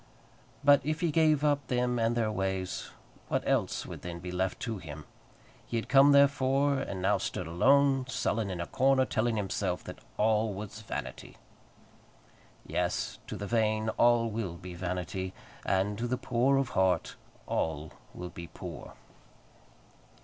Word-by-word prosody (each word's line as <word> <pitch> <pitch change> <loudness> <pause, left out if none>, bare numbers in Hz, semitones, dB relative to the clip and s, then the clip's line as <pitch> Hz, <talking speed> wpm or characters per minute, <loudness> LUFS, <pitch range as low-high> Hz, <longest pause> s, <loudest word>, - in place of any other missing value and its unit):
But 145 -1 +6
if 155 +2 -1
he 170 -3 +2
gave 155 -2 +3
up 145 -2 +1
them 125 -1 0
and 115 +1 +1
their 110 -2 +1
ways, 95 -2 -2 0.4
what - - -1
else - - 0
would - - -8
then 85 -1 -6
be 90 +1 -7
left 95 +1 -1
to 115 -5 -3
him? 75 -3 -9 0.6
He 120 - -2
had 115 - -4
come, 140 +1 +7
therefore, 140 0 +4
and 95 -8 -4
now 100 +1 +3
stood 90 - -3
alone, 135 - +3
sullen, 115 -4 -1
in 90 -2 -4
a 85 - -2
corner, 130 +4 +3
telling 115 -1 0
himself 95 -3 -2
that - - -9 0.2
all 110 -1 +2
was 105 +2 -7
vanity. 110 - -6 1.3
Yes; - - -2
to - - -5
the 100 - -5
vain 110 0 +1
all 115 0 +3
will 105 -6 -3
be 90 +1 -9
vanity; 90 +1 -4 0.3
and 100 +2 +1
to 120 - -1
the 125 +1 -1
poor 125 +4 +2
of 135 -2 0
heart 95 -3 +1 0.3
all 80 -1 -2 0.2
will 90 0 -6
be 85 -1 -8
poor. - - -9
110 Hz, 155 wpm, -30 LUFS, 95-130 Hz, 1.3 s, come